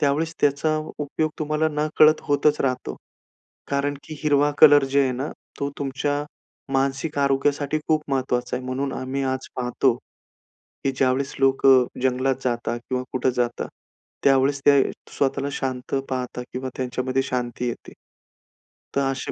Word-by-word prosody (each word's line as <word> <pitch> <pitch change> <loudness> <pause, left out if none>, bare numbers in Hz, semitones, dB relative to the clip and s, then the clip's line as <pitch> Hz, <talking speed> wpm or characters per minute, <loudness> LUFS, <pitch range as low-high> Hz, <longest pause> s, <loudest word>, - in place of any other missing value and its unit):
त्यावेळेस 155 +3 +1
त्याचा 145 +2 +2 0.2
उपयोग 150 +2 -1
तुम्हाला 155 +1 +1
नकळत 155 +1 +4
होतच 145 0 +2
राहतो, 130 - -1 0.7
कारण 140 0 0
की 155 - -8
हिरवा 145 -1 +3
कलर 145 -2 +8
जो 140 - +5
आहे 135 -2 +3
ना, 130 +4 -3 0.3
तो 140 - -1
तुमच्या 145 +1 -1 0.5
मानसिक 135 +3 0
आरोग्यासाठी 140 +2 +1
खूप 155 -1 +2
महत्त्वाचा 125 -2 0
आहे. 125 - -8
म्हणून 130 +2 -2
आम्ही 135 +1 -3
आज 130 0 -2
पाहतो, 125 +1 +1 0.9
की 135 - +1
ज्यावेळेस 135 +1 +1
लोकं 135 -1 +5 0.2
जंगलात 130 0 +2
जातात 120 -1 -1
किंवा 125 0 -1
कुठं 130 0 +1
जातात, 120 -1 -1 0.6
त्यावेळेस 135 +1 +4
ते 140 -1 +7 0.3
स्वतःला 140 0 0
शांत 130 -1 -3
पाहतात 125 -1 -3
किंवा 130 +1 -3
त्यांच्यामध्ये 130 +1 -1
शांती 125 -1 -2
येते, 120 - -6 1.0
तर 140 - +3
असे 135 +1 -4
135 Hz, 135 wpm, -23 LUFS, 130-145 Hz, 1.0 s, कलर